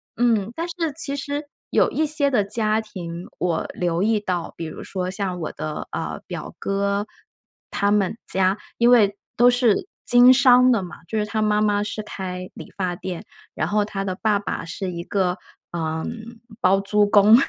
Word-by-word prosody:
嗯， 225 -4 +2
但 330 - -2
是 335 - -6 0.2
其 285 -3 -5
实 285 +1 -3 0.3
有 - - +3
一 315 - +1
些 295 -2 +3
的 240 -5 +3
家 215 +1 +2
庭， 175 -5 -7
我 170 -3 -1
留 175 -1 -1
意 215 +1 +2
到， 180 -4 -3
比 - - -6
如 155 - -7
说 185 -1 -4
像 185 -3 -2
我 155 - -3
的， 155 -1 -5
呃， - - -4
表 - - -7
哥， 200 +1 -1 0.6
他 200 0 +1
们 205 +1 +1
家 190 +1 +2 0.2
因 235 0 +4
为 205 -5 +5 0.2
都 245 +1 +6
是 245 - +2 0.2
经 245 +1 +8
商 250 0 +6
的 230 -5 +2
嘛， 175 - -9
就 220 - -3
是 210 - 0
他 215 +1 -2
妈 210 -1 +2
妈 205 -1 +2
是 215 +1 -4
开 185 -3 -6
理 - - -11
发 185 -2 -1
店， 180 -1 -6 0.3
然 - - -1
后 210 0 +2
他 200 -1 -4
的 185 -1 -2
爸 215 -2 +3
爸 200 - -4
是 170 +3 -5
一 170 -1 -5
个， 185 -1 0 0.4
呃， 160 -1 -2 0.6
包 190 +2 +4
租 205 +1 +3
公， 205 +1 +7
205 Hz, 200 characters per minute, -23 LUFS, 185-225 Hz, 0.6 s, 经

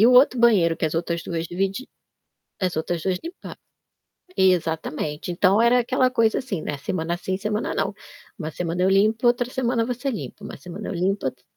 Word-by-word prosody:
E 220 - +7
o 250 - +6
outro 265 - +1
banheiro 175 -8 +4
que - - +1
as - - -7
outras 170 0 -2
2 165 -1 -2
dividi 195 +6 -1 0.8
as 180 - -2
outras 165 +1 -2
2 185 0 0
limpa 345 +3 -8 0.9
Exatamente. 160 -3 0
Então, 195 +4 +3
era 240 +1 +5
aquela 255 +1 +2
coisa, 230 -3 +2
assim, 205 -11 -4
né, 145 - -4
semana 165 +3 -2
sim, 185 +1 -3
semana 210 +2 -2
não. - - 0 0.5
"Uma 155 -2 -4
semana 175 +2 -3
eu 185 - +4
limpo, 215 +5 +3
outra 245 0 +2
semana 245 -2 0
você 250 +3 -2
limpa, 210 -3 -6
uma - - -7
semana 180 +4 -7
eu - - -3
limpo, 185 0 0
outra" 130 -1 -6
195 Hz, 190 wpm, -23 LUFS, 170-235 Hz, 0.9 s, E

